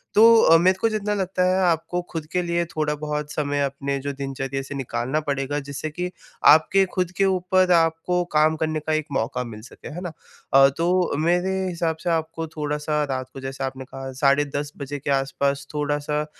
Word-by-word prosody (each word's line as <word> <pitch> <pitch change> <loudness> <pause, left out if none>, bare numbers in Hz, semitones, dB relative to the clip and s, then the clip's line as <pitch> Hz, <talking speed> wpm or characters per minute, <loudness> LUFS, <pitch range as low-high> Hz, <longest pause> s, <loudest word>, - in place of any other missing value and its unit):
तो 230 +2 +8
अ, 165 - +7
मेरे 185 +3 +3
को 225 - +3
जितना 210 -1 -1
लगता 190 -2 -1
है 185 +1 +2
आपको 165 +2 -1
खुद 160 -2 -5
के 180 - +1
लिए 170 0 0
थोड़ा 155 -2 -2
बहुत 150 0 -4
समय 145 -1 -1
अपने 140 0 -2
जो 140 +1 -3
दिनचर्या 135 0 -4
से 145 +1 -7
निकालना 130 +2 -2
पड़ेगा, 140 0 -2
जिससे 140 +2 -5
कि 180 +4 -4 0.4
आपके 175 +6 +6
खुद 180 -1 -1
के 195 - +3
ऊपर 185 -1 +2
आपको 165 +1 +2
काम 155 +1 +4
करने 155 0 -1
का 155 +1 -2
एक 155 -1 0
मौका 125 0 -1
मिल 110 -3 -9
सके, 120 - -12
है 165 +3 -7
ना? 175 -3 -5 0.4
अ, 135 0 +8
तो 175 -2 +1
मेरे 175 +4 +1 0.2
हिसाब 165 -2 -1
से - - -1
आपको 165 0 -2
थोड़ा-सा 150 0 -2
रात 130 -1 -3
को - - -8
जैसे 135 0 -5
आपने 130 0 -4
कहा 135 0 -7
साढ़े 140 +1 +4
10 145 +1 -4
बजे 145 0 -5
के 140 - -5
आस-पास 140 +1 0
थोड़ा-सा 150 0 -1
अ, - - -4
150 Hz, 200 wpm, -23 LUFS, 140-170 Hz, 0.4 s, तो